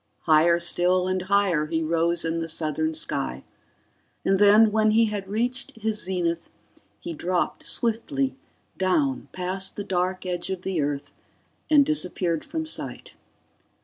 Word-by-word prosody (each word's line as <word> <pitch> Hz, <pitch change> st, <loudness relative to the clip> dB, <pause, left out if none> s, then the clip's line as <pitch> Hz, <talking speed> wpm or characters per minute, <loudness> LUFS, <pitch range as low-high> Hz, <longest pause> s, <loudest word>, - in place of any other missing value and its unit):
Higher 165 Hz, +2 st, +4 dB
still 180 Hz, +1 st, +1 dB
and 185 Hz, 0 st, 0 dB
higher 190 Hz, -5 st, +2 dB
he 160 Hz, +1 st, -1 dB
rose 165 Hz, +1 st, +1 dB
in 165 Hz, 0 st, -1 dB
the 165 Hz, 0 st, -3 dB
southern 165 Hz, -, -1 dB
sky, 320 Hz, +1 st, -2 dB, 0.8 s
and 195 Hz, 0 st, +3 dB
then, 210 Hz, +2 st, +7 dB
when 215 Hz, 0 st, +3 dB
he 225 Hz, +2 st, +4 dB
had 205 Hz, -3 st, -4 dB
reached 245 Hz, +7 st, -2 dB
his 220 Hz, -1 st, -2 dB
zenith, 170 Hz, -2 st, -2 dB, 0.5 s
he 170 Hz, -, -6 dB
dropped 175 Hz, +3 st, -1 dB
swiftly 260 Hz, +4 st, -1 dB, 0.4 s
down 265 Hz, +9 st, +1 dB
past 185 Hz, +1 st, -3 dB
the 205 Hz, -, -4 dB
dark 185 Hz, -1 st, -1 dB
edge 180 Hz, -1 st, -3 dB
of 190 Hz, -1 st, -4 dB
the 185 Hz, -5 st, -1 dB
Earth 145 Hz, -1 st, -3 dB, 0.6 s
and 295 Hz, -2 st, +6 dB
disappeared 180 Hz, -, 0 dB
from 320 Hz, -1 st, -4 dB
sight. 315 Hz, -, -6 dB
185 Hz, 145 wpm, -25 LUFS, 170-220 Hz, 0.8 s, then